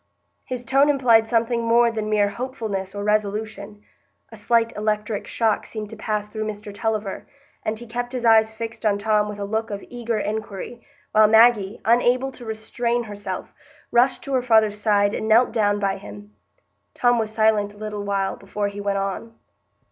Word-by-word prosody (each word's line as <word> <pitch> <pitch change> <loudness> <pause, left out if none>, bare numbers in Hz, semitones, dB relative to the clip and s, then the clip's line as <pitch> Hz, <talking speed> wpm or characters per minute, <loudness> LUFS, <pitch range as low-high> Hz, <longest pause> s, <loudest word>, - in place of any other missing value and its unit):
His 250 -1 -5
tone 275 +4 +4
implied 240 -6 +4
something 235 0 +1
more 235 +1 +4
than 215 -1 -3
mere 205 -1 +2
hopefulness 215 -6 -5
or 205 - -4
resolution. 210 0 -2 0.5
A - - -10
slight 230 +2 +1
electric 210 0 -2
shock 220 -3 0
seemed 215 -2 -6
to - - -7
pass 210 -1 -2
through 215 +1 -4
Mr 210 -1 -7
Tulliver, 215 -1 -3 0.4
and 215 0 -2
he 240 - -8
kept 240 +1 -4
his 250 -2 -3
eyes 220 -1 +5
fixed 225 +1 -7
on 210 -2 +2
Tom 210 0 +1
with 210 - -6
a 200 - -4
look 220 +2 -2
of 200 -1 -6
eager 235 -2 -3
inquiry, 215 +2 -5 0.3
while 215 0 +6
Maggie, 220 -2 +4
unable 245 +3 +3
to 250 -2 -11
restrain 235 +2 -2
herself, 205 -2 -6 0.4
rushed 245 +2 +3
to 275 - -5
her 260 - +2
father's 220 -4 +3
side 205 -1 +2
and 220 - -3
knelt 230 +3 +5
down 205 -3 +2
by 195 -1 -1
him. 105 0 -12 0.6
Tom 245 -1 +3
was 220 -1 -1
silent 215 -2 +2
a - - -17
little 210 -1 -5
while 200 -1 -1
before 205 +1 -3
he 200 0 -7
went 200 -1 -1
on. 195 +4 -4
220 Hz, 180 wpm, -23 LUFS, 205-235 Hz, 0.6 s, while